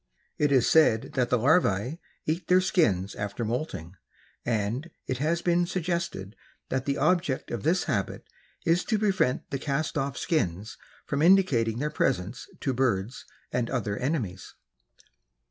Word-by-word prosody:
It 150 -1 +3
is 130 -4 +4
said 135 -6 +4
that 125 -2 +1
the 125 - +3
larvae 130 - +2 0.3
eat 165 +2 -2
their 180 0 +6
skins 115 - +1
after 100 +3 -4
moulting 95 - -4 0.5
and 115 +7 -1 0.2
it 130 - -3
has 165 +4 0
been 175 0 +2
suggested 170 - -3 0.3
that 130 0 -1
the 140 0 0
object 175 -7 +1
of 120 - -3
this 175 - +2
habit - - -2 0.4
is 170 +1 +3
to 220 - +1
prevent 190 -11 +1
the 140 - -2
cast 150 +3 -1
off 135 -3 -2
skins 105 - -1 0.3
from 140 0 -1
indicating 150 - +4
their 150 +4 -1
presence 125 -5 -1
to 135 - 0
birds 120 -3 -1 0.3
and 120 -1 -1
other 105 -6 -1
enemies. 120 - -3
135 Hz, 145 wpm, -27 LUFS, 115-165 Hz, 0.5 s, their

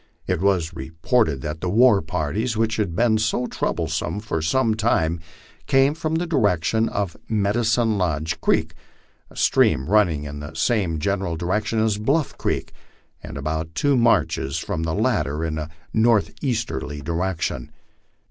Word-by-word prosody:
It - - -1
was 90 -4 +1
reported 80 - 0
that 75 +3 -5
the 90 - -1
war 115 +1 +5
parties, 90 +9 -2
which 110 0 +1
had 100 -6 -1
been 110 +1 +3
so 115 +3 0
troublesome 105 - -2
for 105 -7 -3
some 110 +8 +2
time, 85 -7 +1 0.5
came 135 +2 +4
from 160 0 -2
the 170 +2 0
direction 110 - +1
of 100 -4 -2
Medicine 110 +1 +1
Lodge 80 -1 -1
creek, - - +1 0.6
a - - -18
stream 65 - +3
running 90 -7 +3
in 75 0 -6
the 75 +2 -8
same 90 -2 +1
general 95 +1 -1
di 85 - -5
rection 110 +4 0
as 105 -2 0
Bluff 140 +7 0
creek, - - -2 0.5
and - - -8
about 80 +3 -3
two 145 +6 +2
marches 115 - +2
from 80 - -3
the 80 0 -1
latter 75 +1 0
in 80 -1 -2
a 75 0 -5 0.2
northeaster 115 +1 +1
ly 75 0 -6
direction. 85 -4 -2
100 Hz, 155 wpm, -23 LUFS, 80-115 Hz, 0.6 s, war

